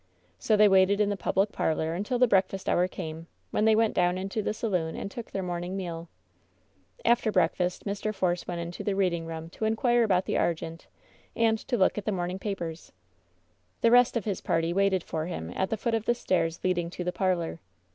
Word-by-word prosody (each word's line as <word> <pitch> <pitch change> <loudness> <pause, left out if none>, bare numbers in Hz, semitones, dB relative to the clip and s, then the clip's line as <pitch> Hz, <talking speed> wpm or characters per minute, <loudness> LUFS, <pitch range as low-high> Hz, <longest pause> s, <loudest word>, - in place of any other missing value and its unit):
So 210 - +2
they 210 0 +7
waited 195 +1 +4
in 210 -1 +3
the 205 - 0
public 195 +1 0
parlor 160 0 -1
until 210 +8 -1
the 250 - +5
breakfast 195 -3 +1
hour 180 +1 +3
came, 165 -2 -7 0.2
when 210 - +1
they 220 -1 +5
went 225 0 +2
down 180 0 +2
into 195 +3 -3
the 210 - -1
saloon 180 -7 -2
and 200 - -5
took 235 +1 -7
their 195 - -3
morning 175 +1 -3
meal. 170 -3 -5 1.0
After 235 -2 +3
breakfast 180 0 0
Mr. 205 +1 -2
Force 180 -4 -1
went 175 -1 -3
into 170 +1 -6
the 200 - -1
reading 175 -4 0
room 165 0 -7
to 220 - -4
inquire 240 +2 +2
about 190 -4 +2
the - - 0
Argente 165 0 -2 0.5
and 225 -1 +2
to 245 - -2
look 190 +1 +3
at 200 - -9
the 215 - 0
morn 180 -2 -2
ing 185 - -5
papers. 175 -6 -5 0.9
The 230 - +4
rest 245 0 +5
of 225 - -3
his 200 -4 -2
party 165 +1 0
waited 195 -1 +2
for 160 0 -3
him 80 - -5
at 190 - 0
the 220 - -1
foot 235 +2 -1
of 225 -1 0
the 240 - +2
stairs 175 -7 0
leading 175 -2 0
to 180 0 -5
the 180 0 -2
parlor. 175 -3 -1
190 Hz, 215 wpm, -28 LUFS, 170-210 Hz, 1.0 s, they